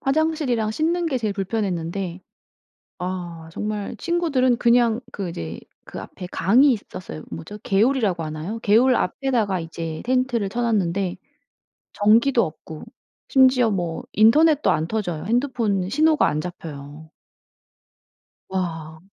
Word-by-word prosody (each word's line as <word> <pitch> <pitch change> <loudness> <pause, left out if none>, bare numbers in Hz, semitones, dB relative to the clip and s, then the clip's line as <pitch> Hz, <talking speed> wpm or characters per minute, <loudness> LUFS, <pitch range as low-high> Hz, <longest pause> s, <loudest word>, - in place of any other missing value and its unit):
화장실이랑 275 -6 0
씻는 335 +7 0
게 275 - 0
제일 215 -3 -1
불편했는데 190 -3 -3 0.8
아 175 -3 -5
정말 210 +2 -4
친구들은 295 -8 +1
그냥 235 -1 +3
그 195 -3 -4
이제 85 - -6 0.2
그 - - -8
앞에 180 - -9
강이 250 +12 +4
있었어요. 180 - -7
뭐죠? 85 - -8
개울이라고 210 -4 +1
하나요? 155 +8 -5
개울 235 +5 +4
앞에다가 215 -3 0
이제 165 -1 -6
텐트를 250 -4 +1
쳐 235 +5 -3
놨는데 195 -5 0 0.8
전기도 230 +4 +4
없고 155 0 -9 0.4
심지어 255 -4 +5
뭐 175 -4 -3
인터넷도 295 +8 +5
안 155 +1 0
터져요. 175 -8 -3
핸드폰 230 -6 0
신호가 310 +4 +3
안 150 - -1
잡혀요. 155 -3 -9 1.4
와. 165 -4 -4
210 Hz, 280 characters per minute, -23 LUFS, 170-250 Hz, 1.4 s, 심지어